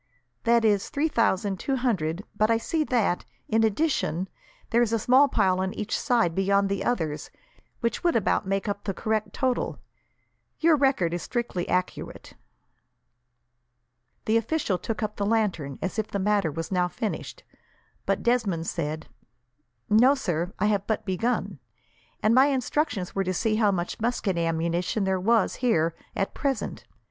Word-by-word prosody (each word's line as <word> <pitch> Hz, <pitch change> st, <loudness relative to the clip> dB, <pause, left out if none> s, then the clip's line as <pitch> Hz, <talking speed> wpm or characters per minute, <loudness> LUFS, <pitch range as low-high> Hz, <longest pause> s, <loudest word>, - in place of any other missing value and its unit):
"That 235 Hz, -1 st, +4 dB
is 205 Hz, -2 st, +2 dB
three 305 Hz, +3 st, 0 dB
thousand 200 Hz, -6 st, +1 dB
two 270 Hz, -, -1 dB
hundred, 195 Hz, -9 st, -1 dB
but 215 Hz, +1 st, +2 dB
I 230 Hz, -, +4 dB
see 310 Hz, +7 st, -1 dB
that, 225 Hz, -9 st, +1 dB, 0.2 s
in 225 Hz, 0 st, +2 dB
addition, 215 Hz, -, 0 dB, 0.4 s
there 235 Hz, -, +4 dB
is 235 Hz, -2 st, +2 dB
a 230 Hz, -, +2 dB
small 255 Hz, +6 st, +5 dB
pile 185 Hz, -8 st, +2 dB
on 190 Hz, 0 st, -2 dB
each 215 Hz, +1 st, -2 dB
side, 230 Hz, -9 st, +2 dB
beyond 195 Hz, +2 st, +2 dB
the 200 Hz, -1 st, -1 dB
others, 160 Hz, -11 st, -2 dB, 0.5 s
which 235 Hz, -1 st, -1 dB
would 345 Hz, -1 st, +2 dB
about 205 Hz, -3 st, +1 dB
make 195 Hz, +2 st, -1 dB
up 205 Hz, 0 st, -3 dB
the 195 Hz, -3 st, -2 dB
correct 220 Hz, 0 st, -1 dB
total. 260 Hz, -2 st, -1 dB, 0.8 s
Your 325 Hz, 0 st, +5 dB
record 265 Hz, -, +2 dB
is 175 Hz, -, -2 dB
strictly 235 Hz, -8 st, -3 dB
accurate." 180 Hz, 0 st, -3 dB, 1.9 s
The 220 Hz, +1 st, +3 dB
official 230 Hz, -, 0 dB
took 220 Hz, +5 st, -3 dB
up 210 Hz, 0 st, -3 dB
the 205 Hz, -, -1 dB
lantern, 190 Hz, -, 0 dB
as 190 Hz, +4 st, -2 dB
if 215 Hz, -, -1 dB
the -, -, -3 dB
matter 200 Hz, -4 st, +1 dB
was 165 Hz, +4 st, -5 dB
now 180 Hz, -1 st, +2 dB
finished, 190 Hz, +5 st, -5 dB, 0.6 s
but -, -, 0 dB
Desmond 215 Hz, -9 st, +1 dB
said: 155 Hz, -1 st, -3 dB, 0.8 s
"No, 245 Hz, +6 st, +5 dB
sir. 175 Hz, -, -2 dB
I -, -, +1 dB
have 205 Hz, -2 st, +1 dB
but 220 Hz, -, -1 dB
begun; 215 Hz, +6 st, -1 dB, 0.6 s
and 215 Hz, -, +4 dB
my 260 Hz, +3 st, +6 dB
instructions 270 Hz, -, -1 dB
were 195 Hz, -, 0 dB
to 185 Hz, 0 st, -2 dB
see 215 Hz, +1 st, +1 dB
how 215 Hz, -2 st, +4 dB
much 175 Hz, -2 st, -3 dB
musket 225 Hz, -4 st, 0 dB
ammunition 170 Hz, +4 st, 0 dB
there 190 Hz, -1 st, +1 dB
was 225 Hz, +1 st, +2 dB
here, 170 Hz, -10 st, +2 dB, 0.2 s
at 195 Hz, -, -1 dB
present. 275 Hz, -2 st, -2 dB
210 Hz, 160 wpm, -26 LUFS, 185-235 Hz, 1.9 s, my